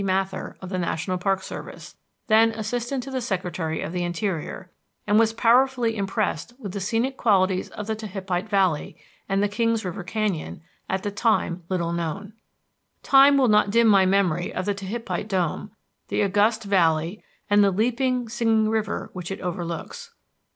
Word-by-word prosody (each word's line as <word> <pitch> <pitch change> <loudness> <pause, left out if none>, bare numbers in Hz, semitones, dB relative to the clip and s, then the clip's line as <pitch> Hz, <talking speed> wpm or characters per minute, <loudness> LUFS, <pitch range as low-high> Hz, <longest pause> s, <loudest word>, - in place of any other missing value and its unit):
Mather, 190 0 -2
of 185 - -6
the 185 -1 -2
National 180 +1 -2
Park 190 0 0
Service, - - -9 0.3
then 225 +1 +5
Assistant 240 +4 -3
to 270 - -8
the 260 -1 -2
Secretary 180 -7 -3
of - - -4
the 180 0 -2
Interior, 175 0 -3 0.3
and 210 +1 +4
was 225 -1 +4
powerfully 240 0 +3
impressed 195 +1 -2
with 210 -8 -7
the 200 - -4
scenic 235 +7 -1
qualities 190 -4 +2
of 210 - -7
the 220 +1 -2
Tehipite 195 -2 -4
Valley, 190 -7 +1 0.3
and 195 +1 +1
the - - +3
Kings 225 +1 0
River 180 +1 -4
Canyon, 195 -5 -3 0.3
at 190 0 -1
that 205 -1 -4
time 205 -6 +1
little 170 -2 -1
known. 170 +5 -4 0.7
Time 275 +1 +6
will 265 -2 +4
not 210 -2 +4
dim 230 +3 +4
my 195 -3 +5
memory 185 -3 +1
of 185 - -3
Tehipite 205 +2 -3
Dome, 190 0 -1 0.4
the - - 0
august 210 +3 +2
valley 170 -1 +1 0.2
and 205 0 +5
the 200 - +4
leaping, 245 +5 0
singing 225 -1 +1
river 220 -2 -2
which 180 -2 -6
it 195 - -5
overlooks. 180 - -5
200 Hz, 165 wpm, -24 LUFS, 185-225 Hz, 0.7 s, Time